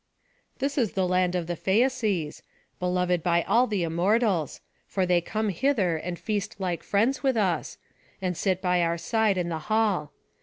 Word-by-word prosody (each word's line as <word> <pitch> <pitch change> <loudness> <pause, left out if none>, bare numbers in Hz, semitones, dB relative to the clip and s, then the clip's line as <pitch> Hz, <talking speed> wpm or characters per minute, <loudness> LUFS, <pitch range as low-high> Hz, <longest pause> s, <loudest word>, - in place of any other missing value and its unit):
"This 280 +1 -1
is 230 -6 0
the 190 -1 +1
land 180 0 +1
of 175 -2 -1
the 175 +1 -3
Phæaces, 205 - 0 0.4
beloved 180 -1 0
by 170 0 +2
all 235 +5 +3
the 205 -6 -1
Immortals; 180 - +1 0.3
for 190 -2 0
they 175 -1 +3
come 215 +4 -2
hither 195 - +1
and 175 +2 -4
feast 210 0 -3
like 180 -3 -2
friends 230 +7 +1
with 265 -4 +1
us, 190 -5 0 0.4
and 185 -2 -2
sit 190 +1 -1
by 180 -1 +2
our 170 0 +1
side 220 +1 +1
in 175 -1 -1
the 160 -1 -3
hall. 210 -9 +1
185 Hz, 175 wpm, -26 LUFS, 175-215 Hz, 0.4 s, all